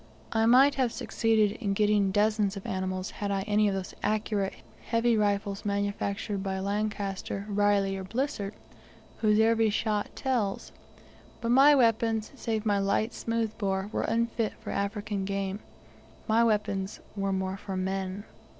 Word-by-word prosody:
I 225 0 +2
might 265 +4 +6
have 245 -2 +2
succeeded 220 -3 +1
in 200 -3 0
getting 210 -1 +3
dozens 210 0 +1
of 195 - -8
animals 185 0 -3
had 205 - -4
I 195 -1 0
any 210 0 +2
of 195 - 0
those 190 -1 -5
accurate, 210 -2 -1 0.3
heavy 230 0 +2
rifles 200 -1 0
manufactured 200 0 -2
by 190 -1 -2
Lancaster, 200 -1 -3
Reilly, 205 -1 +2
or 190 - -5
Blissett, 215 -1 -3 0.6
whose 215 -1 +3
every 225 0 +4
shot 210 0 -1
tells. 235 -7 -1 0.7
But 230 -1 -1
my 275 +4 +7
weapons, 225 -3 +2
save 225 -5 -3
my 205 -2 +2
light 205 +3 0
smoothbore, 210 -3 -2
were - - 0
unfit 230 -1 0
for - - -6
African 205 0 -2
game. 195 0 -2 0.7
My 225 +1 +4
weapons 205 -3 0 0.2
were 195 -1 -1
more 190 0 -2
for 195 -1 -5
men. 190 +1 -2
205 Hz, 145 wpm, -28 LUFS, 195-225 Hz, 0.7 s, my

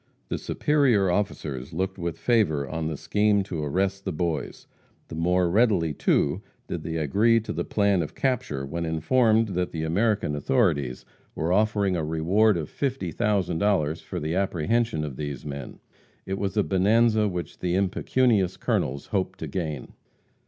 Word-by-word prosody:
The - - -2
superior 125 -11 +2
officers 75 -8 -3
looked 95 +3 -2
with 85 -1 -3
favor 90 - +1
on 80 +1 -3
the 80 -2 -3
scheme 105 +2 +2
to 85 -6 -4
arrest 95 +6 -1
the 95 - -2
Boys. 85 -1 -3 0.4
The - - -6
more 90 +2 +2
readily, 95 -5 +2
too, - - +1 0.3
did - - -4
they 80 - -4
agree 105 +10 +3
to 110 - -5
the - - -2
plan 100 -3 +2
of 80 - -5
capture 110 - -1
when 85 +5 -4
informed 110 +8 +2
that 90 -1 -2
the 80 -1 -3
American 100 -1 +1
authorities 75 - 0 0.3
were 80 +3 0
offering 105 -2 +2
a 80 - -1
reward 85 +7 +2
of 80 -3 -3
$50,000 95 - 0
for - - -5
the 80 +2 -2
apprehension 95 +1 0
of 70 -4 -5
these 75 -2 -5
men. 70 -3 -7 0.5
It 95 0 -3
was 100 +1 -2
a 105 - +4
bonanza 110 +3 +3
which 90 -4 -5
the 90 0 -1
impecunious 100 +1 +1
colonels 70 +2 -1
hoped 95 -2 -2
to 80 - -5
gain. 75 -4 -4
90 Hz, 160 wpm, -25 LUFS, 80-105 Hz, 0.5 s, a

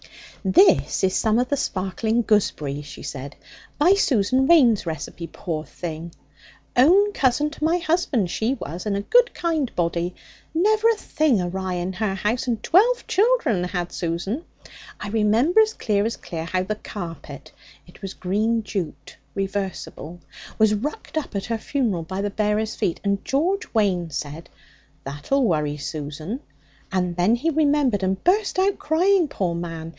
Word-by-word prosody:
'This 185 -7 +4
is 185 0 +2
some 220 0 +2
of 250 +1 +2
the 285 - +2
sparkling 220 +1 -1
gooseberry,' 150 -10 0
she 140 -1 -10
said, 140 0 -6 0.4
'by 345 +6 +5
Susan 260 - +2
Waine's 245 - +5
recipe, 160 +2 -5
poor 160 -4 -4
thing! 165 +2 -7 0.6
Own 380 +11 +5
cousin 280 +1 +1
to 305 - -8
my 330 +3 +3
husband 315 - 0
she 235 +5 0
was, 175 - -6
and 200 -1 0
a - - -1
good - - +4
kind 320 -7 -1
body. 170 +1 -1 0.4
Never 430 +6 +3
a 460 - +3
thing 305 - +1
awry 185 +1 -2
in 180 +2 -3
her 195 0 -1
house, 215 +6 -1
and 230 -3 -1
twelve 475 +8 +4
children 395 - +2
had 180 -1 -3
Susan. 180 - -3 0.6
I 210 - -5
remember 225 - +3
as 435 0 +1
clear 205 -2 0
as 230 - -2
clear 165 -1 -6
how 185 +2 -1
the 190 - -2
carpet 165 -9 -8 0.3
(it 175 - -18
was 195 -1 -6
green 220 +5 0
jute, 190 -6 -5 0.2
reversible) 195 -4 -4 0.4
was 220 -1 +4
rucked 290 +7 -3
up 285 - -9
at 195 - -2
her 230 -1 -2
funeral 230 -10 -1
by 185 +4 -4
the 205 - -1
bearers' 210 +1 0
feet. 170 - -1
And 200 -1 0
George 350 +9 0
Waine 185 -6 +1
said, 150 +2 -6 0.5
"That'll 145 - -1
worry 150 -8 0
Susan," 155 - -5 0.5
and 180 -2 0
then 180 +6 +3
he 310 +7 0
remembered, 285 -8 +2
and 190 0 -1
burst 395 +2 +2
out 385 +1 +2
crying, 350 +3 +3
poor 185 -10 -2
man! 165 -1 -5
210 Hz, 160 wpm, -23 LUFS, 175-280 Hz, 0.6 s, by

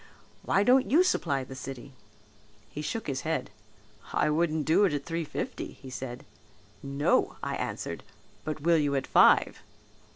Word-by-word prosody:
Why 195 - +2
don't 255 +3 +4
you 330 +6 +5
supply 140 - 0
the 130 - -9
city?' 130 0 -8 0.8
He 150 - -5
shook 220 +8 -3
his 135 -2 -2
head, 160 -8 -2 0.6
'I 150 - +2
wouldn't 155 -1 +1
do 170 +6 +4
it 185 - +1
at 145 -1 -3
three 165 0 -2
fifty,' 150 - -5
he 130 - -12
said. 125 0 -6 0.6
'No,' 140 +1 +1
I - - -2
answered, - - -4 0.4
'but 155 -1 -4
will 170 +2 +4
you 145 -2 +1
at 135 - -1
five?' - - +4
150 Hz, 160 wpm, -28 LUFS, 135-170 Hz, 0.8 s, you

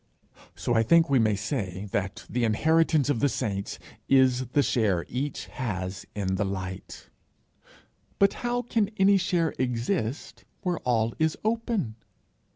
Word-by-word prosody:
So 120 - -1
I 115 - +4
think 165 +7 +4
we 135 - +5
may 110 -2 +3
say 105 -3 -3
that 95 -1 -3
the 125 0 -1
inheritance 155 +6 +3
of 125 - 0
the 145 - +3
saints 100 -4 -3 0.3
is 130 -1 +4
the 140 +4 +2
share 100 -11 +1
each 140 +3 -3
has 95 -7 -5
in 95 -2 -1
the 105 - +1
Light. 95 -1 -6 1.1
But 200 0 +4
how 245 0 -1
can 225 -4 0
any 195 +1 +5
share 175 -4 +1
exist 125 - -2 0.2
where 180 -3 -1
all 115 -2 +1
is 160 -1 +1
open? 225 - -1
125 Hz, 145 wpm, -27 LUFS, 105-165 Hz, 1.1 s, we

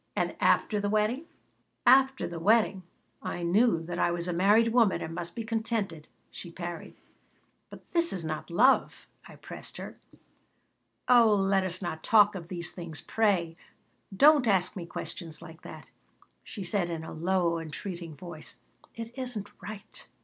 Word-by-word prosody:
"And - - -1
after 210 - +2
the 205 0 -1
wedding?" 215 +8 0 0.6
"After 265 +1 +5
the 170 -1 -6
wedding 205 +1 +3 0.4
I 175 - -4
knew 185 0 +3
that 175 +1 -5
I - - +3
was 170 0 -3
a 180 - -1
married 205 +6 +4
woman 230 -5 +4
and 160 - -5
must 170 0 -6
be 230 - -4
contented," 220 -8 -3 0.2
she 175 - -9
parried 175 0 -7 0.7
"But - - -12
this 340 -1 0
is 175 -4 -4
not 155 +1 -4
love," 240 +10 +3 0.2
I - - -13
pressed - - -8
her - - -9 1.1
"Oh, 235 -4 +6
let 195 -1 +2
us 185 +1 -3
not 160 -2 -4
talk 210 -1 +5
of 175 -4 -7
these 175 -2 -2
things, 170 -3 -7
pray! 190 -7 0 0.6
Don't 290 0 +6
ask 190 -4 +2
me 175 -3 -6
questions 165 -2 -6
like 165 0 -12
that," - - -11 0.5
she 200 - -7
said 175 0 -1
in 165 -1 -4
a - - -8
low, 170 0 0
entreating 165 0 -7
voice. 170 -2 -8 0.4
"It 230 +1 -7
isn't 235 -6 -4
right." 210 -1 -10
190 Hz, 160 wpm, -29 LUFS, 170-220 Hz, 1.1 s, Oh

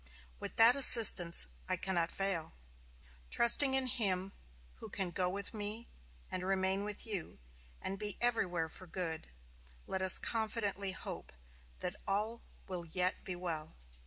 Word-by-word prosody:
With - - -8
that 230 +2 +8
assistance, 220 - +5 0.2
I - - +1
cannot 175 -3 -1
fail. 195 -4 -2 0.8
Trusting 265 +3 +6
in 265 -1 +3
Him 195 -6 -1 0.5
who - - -11
can 190 -3 -3
go 180 +1 -2
with 200 +3 -5
me, 215 +2 -6 0.4
and 185 - -4
remain 190 +1 -1
with 210 +2 -5
you, 200 -7 -5 0.4
and 195 0 -6
be 210 -2 -5
everywhere 180 -9 -1
for 185 +3 -11
good, 165 -2 -6 0.6
let 190 - -5
us 190 0 +9
confidently 210 -3 -2
hope - - -9 0.5
that 180 +2 -3
all 210 +4 -2 0.3
will 180 -2 -7
yet 180 +3 -3
be 185 - -7
well. 165 -3 -7
195 Hz, 140 wpm, -33 LUFS, 180-215 Hz, 0.8 s, us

